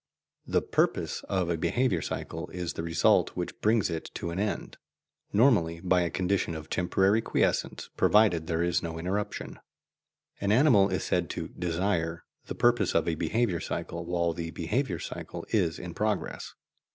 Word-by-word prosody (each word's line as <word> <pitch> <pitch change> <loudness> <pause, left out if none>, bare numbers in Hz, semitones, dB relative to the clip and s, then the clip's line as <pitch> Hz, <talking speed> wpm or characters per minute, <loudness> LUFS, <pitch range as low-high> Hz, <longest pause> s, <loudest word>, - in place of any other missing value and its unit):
The - - +1
"purpose" - - 0
of 95 -3 0
a 85 - 0
behaviour 90 +2 +1
cycle - - -4
is 90 -3 -4
the - - -4
result 85 0 +2
which - - -4
brings 110 -1 +3
it 80 -1 -4
to 85 - -3
an 85 - -3
end, 105 +1 -3 0.5
normally 100 -8 +3
by 90 +1 +2
a 85 - 0
condition 90 -2 0
of 80 0 -8
temporary 95 +4 +2
quiescence - - 0
provided 100 -7 +4
there 85 0 0
is 85 0 +1
no 80 -1 -5
interruption. 95 +5 -3 0.8
An 100 0 0
animal 110 -5 +5
is 95 -2 -1
said - - 0
to - - -4
"desire" 85 -1 -1 0.2
the - - -5
purpose 120 -5 +2
of 85 - +2
a 85 - +1
behaviour 90 +3 0
cycle 85 +2 -4
while 85 -1 0
the 85 0 -4
behaviour 90 - -1
cycle - - -7
is 90 -7 +1
in 85 -1 -7
progress. 105 +1 -2
90 Hz, 165 wpm, -28 LUFS, 85-105 Hz, 0.8 s, animal